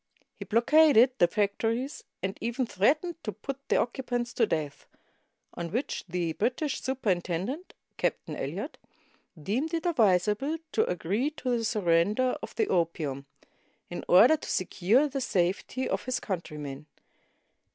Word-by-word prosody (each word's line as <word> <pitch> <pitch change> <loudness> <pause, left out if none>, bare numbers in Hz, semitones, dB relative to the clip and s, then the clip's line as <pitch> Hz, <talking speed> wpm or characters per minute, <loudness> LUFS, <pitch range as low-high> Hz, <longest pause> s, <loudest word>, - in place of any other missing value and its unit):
He - - -9
blockaded 255 +2 +5
the 175 - +6
factories, 225 - -1 0.2
and 190 +1 -2
even 235 +3 -1
threatened 305 - +1
to 215 - -3
put 265 +7 -6
the - - +3
occupants 245 -1 -1
to 230 - +2
death; 150 -5 -3 0.7
on 170 -1 -5
which 245 +8 -2
the 170 -2 -1
British 255 - -1
superintendent 220 - -2
— - - -51
Cap - - +1
tain - - -6
Eliot - - -5 0.3
— 155 - -20
deemed 285 +10 0
it 330 - -3
advisable 225 - +2
to - - +2
agree 195 - 0
to 260 -5 -2
the 230 - -1
sur 220 -1 -1
render 200 +9 +2
of - - -8
the 440 -3 +1
opium, 155 -5 -1 0.6
in 175 - -5
order 240 - +7
to - - -9
secure 200 - +2
the 275 -1 -3
safety 195 +6 0
of - - -2
his 255 0 -1
countrymen. 150 -6 -5
225 Hz, 150 wpm, -28 LUFS, 180-265 Hz, 0.7 s, order